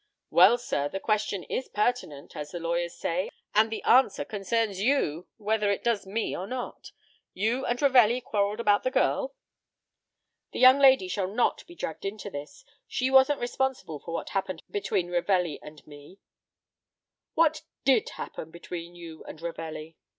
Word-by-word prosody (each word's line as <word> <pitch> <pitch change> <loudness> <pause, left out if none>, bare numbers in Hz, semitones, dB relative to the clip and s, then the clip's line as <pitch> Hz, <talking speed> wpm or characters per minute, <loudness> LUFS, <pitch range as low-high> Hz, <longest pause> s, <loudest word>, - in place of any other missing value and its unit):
"Well, 190 +7 +7
sir, 145 - -2
the 195 - -4
question 210 -3 -1
is 260 - -3
pertinent 210 - -2
as 150 0 -5
the 175 - -6
lawyers 170 +1 -2
say 180 +3 -2 0.2
and 220 +1 +4
the 225 - -4
answer 260 +2 +4
concerns 210 -1 -1
you, 200 - +1
whether 210 -1 0
it 200 - -1
does 230 -5 0
me 220 +4 -2
or 185 - -5
not. 250 +2 -6 0.4
You 230 +7 0
and 240 0 -1
Ravelli 250 -4 +5
quarreled 210 -2 -1
about 205 -3 +3
the 255 - 0
girl?" - - 0 1.2
"The - - -4
young 255 +2 +8
lady 265 -8 +6
shall 185 +1 -1
not 220 +5 0
be 345 - -13
dragged 160 - -5
into 200 0 -5
this. 150 - -9 0.2
She 260 +1 -1
wasn't 265 +1 +5
responsible 245 - -2
for 165 - -9
what - - -4
happened 185 -3 -3
between 195 -3 -1
Ravelli 175 -2 +1
and 150 0 -13
me." 145 +5 -14 1.2
"What 320 -1 +3 0.2
did 260 -5 +3
happen 160 - -7
between 170 +1 -8
you 165 -2 -10
and - - -9
Ravelli?" 165 -1 -6
205 Hz, 160 wpm, -27 LUFS, 170-245 Hz, 1.2 s, young